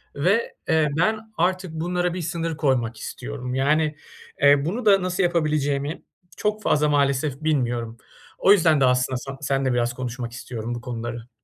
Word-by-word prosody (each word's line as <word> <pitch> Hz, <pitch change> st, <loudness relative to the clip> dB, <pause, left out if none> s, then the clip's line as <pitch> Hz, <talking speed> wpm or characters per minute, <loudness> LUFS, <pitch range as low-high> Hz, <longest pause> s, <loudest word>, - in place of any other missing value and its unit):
ve, 190 Hz, +11 st, +1 dB
eee, 160 Hz, -2 st, +3 dB
ben 220 Hz, +5 st, 0 dB
artık 185 Hz, 0 st, 0 dB
bunlara 175 Hz, +2 st, -1 dB
bir 180 Hz, -, -4 dB
sınır 165 Hz, -1 st, -3 dB
koymak 120 Hz, -7 st, 0 dB
istiyorum 125 Hz, -, -6 dB
yani, 150 Hz, +3 st, +2 dB, 0.5 s
eee, 140 Hz, 0 st, +6 dB
bunu 220 Hz, +7 st, -3 dB
da 195 Hz, -2 st, +6 dB
nasıl 185 Hz, +1 st, 0 dB
yapabileceğimi 150 Hz, -3 st, 0 dB, 0.4 s
çok 215 Hz, 0 st, -1 dB
fazla 150 Hz, 0 st, +2 dB
maalesef 140 Hz, 0 st, +1 dB
bilmiyorum. 120 Hz, -6 st, -1 dB, 0.4 s
O 195 Hz, -, +4 dB
yüzden 160 Hz, -7 st, +5 dB
de -, -, +6 dB
aslında 125 Hz, 0 st, +2 dB
san 135 Hz, +1 st, -7 dB
seninle 135 Hz, -2 st, 0 dB
biraz 120 Hz, 0 st, 0 dB
konuşmak 120 Hz, -1 st, -5 dB
istiyorum 120 Hz, -1 st, -5 dB
bu 120 Hz, -, -7 dB
konuları. 120 Hz, -1 st, -6 dB
145 Hz, 155 wpm, -23 LUFS, 125-170 Hz, 0.5 s, eee